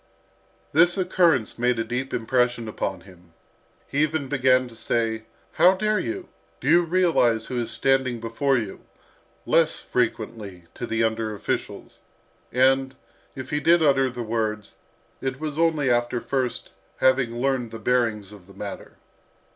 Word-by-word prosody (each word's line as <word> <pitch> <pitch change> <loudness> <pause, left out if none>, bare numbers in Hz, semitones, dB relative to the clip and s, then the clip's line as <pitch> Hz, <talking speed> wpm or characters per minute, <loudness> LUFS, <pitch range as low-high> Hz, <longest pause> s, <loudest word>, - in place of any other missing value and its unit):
This 175 +4 +4
occurrence 170 - +2
made 125 0 +2
a 115 - 0
deep 125 +4 -3
impression 120 0 0
upon 95 -3 -4
him. 90 -2 -18 0.5
He 145 - -1
even 155 -3 0
began 130 -2 +3
to 120 - -13
say, 110 -1 -1 0.3
"How 185 +2 +5
dare 215 +2 +1
you? 360 +1 -4 0.3
Do - - -6
you 175 - +6
realise 165 -10 +2
who 125 - -3
is 120 - -3
standing 135 -3 +1
before 125 +4 0
you?" 110 -4 -5 0.6
less 165 -1 +2
frequently 110 -6 -3
to 120 - -6
the 115 0 0
under 110 -1 -1
officials, 100 - -5 0.5
and, 135 +1 +2 0.4
if 130 -1 -7
he 150 - +1
did 165 +3 +4
utter 135 -3 +3
the 120 -1 -5
words, 110 -2 -3 0.4
it 135 -1 -3
was 155 -1 -4
only 155 -5 +2
after 120 0 +1
first 130 -1 -2 0.3
having 130 -3 +2
learned 125 -1 -1
the 115 - -8
bearings 110 -3 0
of 100 -4 -14
the 100 - -16
matter. 100 0 -8
125 Hz, 150 wpm, -24 LUFS, 115-140 Hz, 0.6 s, you